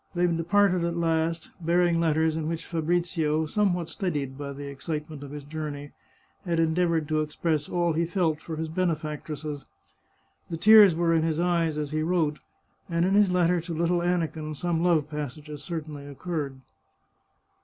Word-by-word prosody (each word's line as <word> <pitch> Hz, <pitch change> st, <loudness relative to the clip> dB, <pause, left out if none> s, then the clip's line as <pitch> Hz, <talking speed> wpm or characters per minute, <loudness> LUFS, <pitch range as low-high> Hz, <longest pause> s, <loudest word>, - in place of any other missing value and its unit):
They 175 Hz, 0 st, +3 dB
departed 175 Hz, +2 st, +2 dB
at 170 Hz, 0 st, -1 dB
last, 165 Hz, 0 st, 0 dB
bearing 170 Hz, 0 st, +3 dB
letters 160 Hz, -1 st, +2 dB
in 160 Hz, -1 st, -2 dB
which 165 Hz, 0 st, -3 dB
Fabrizio, 165 Hz, -2 st, 0 dB
somewhat 180 Hz, -1 st, 0 dB
steadied 150 Hz, -8 st, -3 dB
by 140 Hz, 0 st, -6 dB
the 140 Hz, +1 st, -7 dB
excitement 150 Hz, +1 st, -5 dB
of 140 Hz, -, -8 dB
his 145 Hz, 0 st, -7 dB
journey, 145 Hz, -1 st, -6 dB, 0.5 s
had 170 Hz, -3 st, 0 dB
endeavoured 165 Hz, -1 st, +1 dB
to 155 Hz, 0 st, +2 dB
express 155 Hz, 0 st, -1 dB
all 175 Hz, -2 st, +1 dB
he 165 Hz, +2 st, +1 dB
felt 165 Hz, -4 st, 0 dB
for 165 Hz, -, -6 dB
his 160 Hz, +1 st, -3 dB
benefactresses. 155 Hz, -3 st, -3 dB, 0.9 s
The 165 Hz, -, -3 dB
tears 210 Hz, -1 st, +8 dB
were 170 Hz, 0 st, +2 dB
in 165 Hz, -, +3 dB
his 160 Hz, 0 st, 0 dB
eyes 170 Hz, -3 st, +1 dB
as 150 Hz, -1 st, -3 dB
he 155 Hz, 0 st, 0 dB
wrote, 160 Hz, -2 st, 0 dB, 0.5 s
and 170 Hz, 0 st, +1 dB
in 190 Hz, -, +1 dB
his 205 Hz, -1 st, +5 dB
letter 180 Hz, -1 st, +2 dB
to 170 Hz, 0 st, -5 dB
little 170 Hz, +2 st, +1 dB
Aniken 160 Hz, -3 st, -1 dB
some 170 Hz, +1 st, -1 dB
love 165 Hz, -4 st, +3 dB
passages 150 Hz, 0 st, -6 dB
certainly 150 Hz, -3 st, -6 dB
occurred. 145 Hz, -2 st, -4 dB
160 Hz, 165 wpm, -27 LUFS, 150-175 Hz, 0.9 s, tears